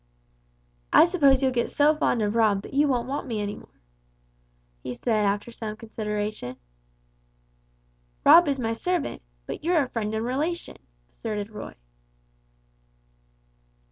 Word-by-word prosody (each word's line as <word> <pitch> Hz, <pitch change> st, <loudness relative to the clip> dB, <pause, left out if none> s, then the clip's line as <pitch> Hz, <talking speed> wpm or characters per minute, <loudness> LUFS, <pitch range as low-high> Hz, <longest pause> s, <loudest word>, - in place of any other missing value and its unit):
"I -, -, +8 dB
suppose 280 Hz, -7 st, +3 dB
you'll 260 Hz, -, +3 dB
get 240 Hz, -2 st, -1 dB
so 295 Hz, +1 st, +3 dB
fond 245 Hz, -7 st, +1 dB
of 205 Hz, 0 st, 0 dB
Rob, 215 Hz, -4 st, +2 dB
that -, -, -11 dB
you 290 Hz, +2 st, +3 dB
won't 245 Hz, -3 st, 0 dB
want 275 Hz, +1 st, -4 dB
me 225 Hz, -4 st, -3 dB
any 205 Hz, 0 st, -3 dB
longer," -, -, -15 dB, 1.0 s
he 125 Hz, -, -5 dB
said, 215 Hz, -, 0 dB
after 205 Hz, +3 st, -1 dB
some 220 Hz, -2 st, -6 dB
consideration. 210 Hz, -, -4 dB, 1.7 s
"Rob 345 Hz, -1 st, +8 dB
is 275 Hz, -2 st, 0 dB
my 225 Hz, -2 st, -1 dB
servant, 355 Hz, +6 st, -2 dB, 0.2 s
but -, -, -7 dB
you're 335 Hz, -2 st, +3 dB
a 255 Hz, -, -6 dB
friend 220 Hz, -2 st, -3 dB
and 220 Hz, +1 st, -2 dB
relation," 305 Hz, +8 st, -2 dB, 0.4 s
asserted 210 Hz, -1 st, -5 dB
Roy. 210 Hz, -, -8 dB
230 Hz, 140 wpm, -25 LUFS, 210-280 Hz, 1.7 s, I